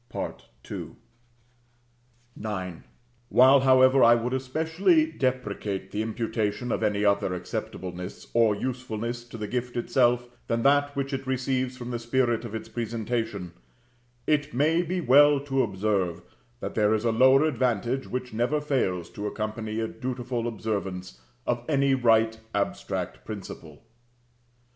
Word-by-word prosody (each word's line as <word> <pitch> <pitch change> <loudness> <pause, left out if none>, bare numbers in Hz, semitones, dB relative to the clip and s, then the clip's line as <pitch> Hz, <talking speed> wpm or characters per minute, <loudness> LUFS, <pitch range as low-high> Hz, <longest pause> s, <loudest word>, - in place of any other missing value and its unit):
[F] - - -17
John - - -3 0.3
xii. - - -5 1.5
5. 95 -4 -3
IX. - - -17 0.5
While, 130 +2 +7
however, 130 0 +5
I 120 0 +8
would 120 +2 -2
especially 160 - +2
deprecate 105 -7 -2
the 105 - -2
imputation 110 0 -2
of - - -1
any 105 -1 +1
other 100 -2 +2
acceptableness 90 +1 -6
or 115 -3 +4
usefulness 120 0 -4
to 115 -1 -10
the 105 - -4
gift 125 +2 -3
itself 120 0 +2 0.2
than 115 0 0
that 145 +1 +3
which 140 0 -2
it 135 0 -4
receives 130 -1 -1
from 125 0 -6
the 120 - -2
spirit 120 -1 +1
of 110 -1 -6
its 110 - -5
presentation, 115 -5 -3 0.7
it 150 -2 0
may 155 +6 +3
be 180 +1 -2
well 145 +1 +6
to 135 -2 0
observe, 95 -5 -1 0.4
that - - -4
there 105 0 +3
is 110 +2 -2
a 115 - +3
lower 130 +5 +5
advantage 125 -3 0
which 125 -2 -4
never 120 +7 +1
fails 95 - -1
to 105 0 -4
accompany 110 +1 -4
a 110 - -1
dutiful 125 -1 -3
observance 100 -5 -4 0.2
of 120 -1 -1
any 140 -2 +3
right 115 -3 +3 0.2
abstract 100 - -2
principle. 90 -7 -9
120 Hz, 145 wpm, -26 LUFS, 110-130 Hz, 1.5 s, I